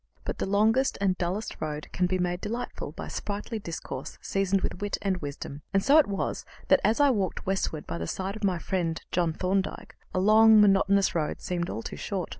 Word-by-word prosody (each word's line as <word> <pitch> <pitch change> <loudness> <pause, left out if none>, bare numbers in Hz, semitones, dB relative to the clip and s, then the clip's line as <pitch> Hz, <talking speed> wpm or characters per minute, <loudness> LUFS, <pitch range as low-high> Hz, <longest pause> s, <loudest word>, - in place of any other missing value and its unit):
But - - -4
the - - -1
longest 220 +7 +3
and 195 -2 +2
dullest 185 +5 -3
road 150 -1 -4
can 180 - +1
be 185 +1 0
made 180 0 -1
delightful 235 +3 -4
by - - -7
sprightly 210 +2 -4
discourse 165 -7 -6
seasoned 195 0 0
with 180 - -4
wit 205 0 -1
and 195 -2 +1
wisdom, 145 -2 -6
and 195 - +3
so 290 +3 +6
it 310 - +4
was 200 -1 -2 0.3
that, - - +6
as 220 +5 +2
I 285 -1 +6
walked 200 -6 -2
westward 190 -5 -1
by 85 - -5
the 80 - -3
side 190 - -3
of 220 - -9
my 190 -3 +2
friend 170 -2 -2
John 170 -2 +1
Thorndyke, 190 +3 -2 0.2
the - - -3
long, 215 +2 +7
monotonous 200 -1 +4
road 155 -3 -1
seemed 175 -1 -2
all 110 - -4
too - - -6
short. - - -3
190 Hz, 210 wpm, -27 LUFS, 175-205 Hz, 0.3 s, long